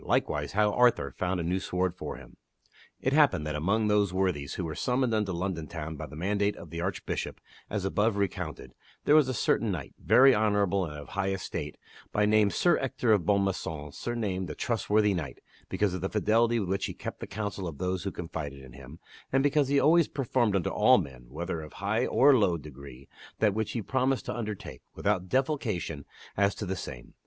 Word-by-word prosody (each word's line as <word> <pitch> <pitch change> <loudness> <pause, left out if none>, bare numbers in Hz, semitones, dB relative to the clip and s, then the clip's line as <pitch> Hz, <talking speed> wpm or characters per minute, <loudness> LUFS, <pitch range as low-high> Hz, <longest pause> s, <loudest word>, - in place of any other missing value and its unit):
Likewise, - - 0
How 105 0 +3
Arthur 125 -1 +3
Found 90 0 -2
a - - -2
New 90 +3 0
Sword 90 -1 -1
For - - -6
Him. - - -13 0.7
IT 130 - +1
happened 145 - +4
that 75 - -2
among 100 +9 +1
those 105 -2 +3
worthies 90 -7 -1
who 90 - -3
were 80 - -4
summoned 125 - 0
unto 105 -3 0
London 85 -2 -3
Town 80 -2 -6
by 75 +1 -6
the 75 - -11
mandate 100 +5 0
of 85 - -11
the 85 0 -4
Archbishop 95 +1 -3 0.3
as 100 -2 -2
above 105 +2 +1
recounted, 100 -2 -3 0.3
there 145 - +5
was 150 -3 +6
a - - 0
certain 115 0 +1
knight, 80 -8 -5
very 135 +1 +7
honorable 100 -4 +2
and 75 -2 -7
of 75 - -10
high 95 -1 -1
estate, 95 -2 -4 0.3
by 105 - +2
name 105 -1 +4
Sir 175 - +2
Ector 125 -3 0
of 95 -6 +3
Bonmaison 95 -7 0
surnamed 100 -4 -3
the 75 - -6
Trustworthy 105 -2 +1
Knight, 75 -9 -4 0.3
because 105 -3 0
of 90 - -4
the 95 - -1
fidelity 115 +2 +2
with 100 - -2
which 95 0 0
he - - -7
kept - - -6
the - - -6
counsel 100 -3 -4
of 80 -4 -7
those 90 0 -2
who 100 - -1
confided 75 -6 -6
in 65 -2 -13
him, 70 +3 -11 0.3
and 135 0 +3
because 145 -1 +3
he 140 +1 +3
always 165 +2 +5
performed 120 -6 0
unto 95 - 0
all - - +5
men, 65 -3 -5
whether 85 +4 -4
of 75 - -10
high 105 +5 0
or 140 +1 +5
low 95 -8 +3
degree, 70 -3 -11 0.3
that 105 -3 +3
which 110 0 -2
he 115 - -2
promised 130 +2 0
to - - -3
undertake, 105 -4 -6
without 95 -3 0
defalcation 115 - -1 0.3
as 100 0 +2
to 105 - -4
the 95 0 -2
same. 60 -8 -8
100 Hz, 205 wpm, -29 LUFS, 85-110 Hz, 0.7 s, very